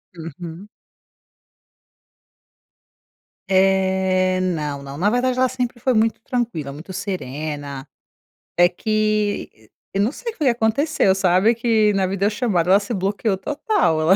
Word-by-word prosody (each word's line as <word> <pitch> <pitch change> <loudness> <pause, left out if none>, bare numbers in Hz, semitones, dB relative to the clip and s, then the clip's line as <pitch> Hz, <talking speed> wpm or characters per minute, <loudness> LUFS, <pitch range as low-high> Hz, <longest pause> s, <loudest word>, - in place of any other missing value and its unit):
Uhum. 165 +3 -8 2.8
Eh, 190 -1 +2
não, 150 -6 -2
não, 140 0 -8
na 195 +6 +2
verdade 250 +2 +1
ela 260 - +4
sempre 250 -1 -3
foi 255 +2 +1
muito 220 0 +2
tranquila, 225 - -3
muito 160 +6 -10
serena. 145 -6 -5 0.7
É 175 0 +7
que 210 - -2 0.2
eu 195 - +1
não 220 - +2
sei 465 +8 -6
o - - -25
que - - -36
que 265 - +5
aconteceu, 230 -2 +2
sabe, 195 +4 +3
que 220 -3 +2
na 195 -1 +1
vida 195 +1 -1
eu 205 - +4
chamo 215 -3 -1
ela 185 +4 +5
se 210 +3 -5
bloqueou 195 +1 -1
total 295 - 0
ela 175 +5 +5
195 Hz, 140 wpm, -21 LUFS, 175-225 Hz, 2.8 s, É